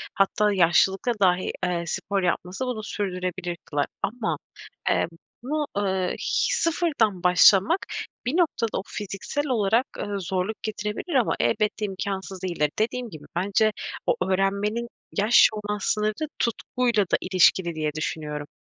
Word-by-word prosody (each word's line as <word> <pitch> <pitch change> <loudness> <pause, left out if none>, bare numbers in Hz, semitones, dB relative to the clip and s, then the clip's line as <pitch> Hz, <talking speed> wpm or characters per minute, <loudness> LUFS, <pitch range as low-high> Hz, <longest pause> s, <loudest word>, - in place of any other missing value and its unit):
Hatta 205 +1 +2
yaşlılıkta 190 +5 +3
dahi, 185 -1 +3
eee, 175 -1 -1
spor 195 -2 -1
yapması 180 +6 -1
bunu 230 -4 -3
sürdürebilir 180 -3 -3
kılar. 145 -2 0 0.2
Ama 235 -1 -1 0.5
emm - - +2 0.4
buna, 300 +3 -1
eee, 190 -2 0
h - - 0
sıfırdan 305 - +1
başlamak 195 - +6 0.5
bir 270 +8 0
noktada 295 -10 +1
o 190 - -5
fiziksel 205 +9 -4
olarak, 230 -1 +2
eee, - - -3
zorluk 190 +3 -3
getirebilir 215 +8 -3
ama 250 - +3
elbette 215 0 +1
imkânsız 195 -1 -4
değildir. 170 -5 0
Dediğim 235 +2 -1
gibi 155 -5 -11
bence 200 +4 +2 0.4
o - - +4 0.2
öğrenmenin 200 +5 0 0.3
yaş 210 +4 +6
olan 210 -1 -3
sınırı 215 +10 0
tutkuyla 235 -1 +1
da 185 - +1
ilişkili 185 -2 +3
diye 155 -1 -1
düşünüyorum. 150 -1 -4
200 Hz, 130 wpm, -25 LUFS, 185-230 Hz, 0.5 s, başlamak